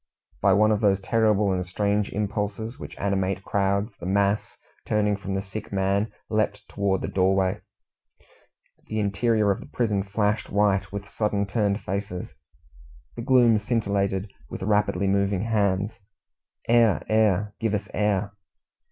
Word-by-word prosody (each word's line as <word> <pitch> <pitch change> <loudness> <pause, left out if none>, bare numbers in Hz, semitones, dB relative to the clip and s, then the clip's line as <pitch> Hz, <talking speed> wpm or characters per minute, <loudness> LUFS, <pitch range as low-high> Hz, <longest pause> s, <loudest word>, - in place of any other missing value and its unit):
By 100 - +5
one 105 +3 +4
of 105 - +1
those 100 -2 +3
terrible 105 -1 +2
and 90 -1 0
strange 100 +3 0
impulses 105 +4 -3
which - - -9
animate 95 -1 -1
crowds, 100 +2 0
the 90 - -6
mass, 100 +2 0 0.3
turning 105 -1 +1
from 100 -1 -4
the 95 - -2
sick 100 +2 -7
man, 100 +2 0 0.2
leapt 105 -2 -1
towards 100 -2 -1
the - - -1
doorway. 95 0 +1 1.3
The 110 - -2
interior 105 +1 +2
of 95 - -1
the - - -11
prison 105 -5 0
flashed 105 +2 -1
white 100 -1 +1
with 100 0 -6
suddenly 105 -1 -1
turned 100 0 0
faces. 95 -2 -4 0.8
The 120 - -5
gloom 120 -3 +4
scintillated 100 -3 -1 0.2
with - - -6
rapidly 105 -2 +1
moving 100 0 +1
hands. 100 -2 0 0.7
"Air! 115 -4 +4
air! 105 -2 +2
Give 110 -2 0
us 100 -1 -3
air!" 105 -1 0
100 Hz, 145 wpm, -25 LUFS, 100-105 Hz, 1.3 s, By